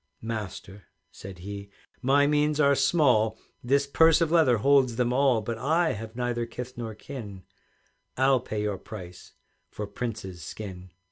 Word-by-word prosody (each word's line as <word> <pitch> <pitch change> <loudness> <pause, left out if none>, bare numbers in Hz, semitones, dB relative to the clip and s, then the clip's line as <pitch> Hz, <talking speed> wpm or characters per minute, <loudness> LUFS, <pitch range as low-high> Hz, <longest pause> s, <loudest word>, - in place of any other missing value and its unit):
"Master," 105 -3 -6 0.3
said 95 -1 -10
he, 100 +2 -8 0.3
"my 140 +3 +4
means 150 +1 +2
are 140 -2 +5
small, 130 -6 +3 0.3
This 140 +3 +2
purse 160 +3 +5
of 165 -2 +1
leather 155 -8 +4
holds 130 +1 +3
them 125 0 +1
all; 130 -4 +3
But 115 +1 -4
I 160 +6 +2
have 110 +1 -8
neither 120 -1 -2
kith 125 +2 -7
nor 115 -3 -6
kin, 105 -6 -9 0.7
I'll 130 0 +4
pay 110 -3 -4
your 105 -3 -2
price 90 -5 -10 0.4
for 105 - -5
Prince's 100 -4 -6
skin. 95 +1 -8
120 Hz, 150 wpm, -27 LUFS, 105-140 Hz, 0.7 s, are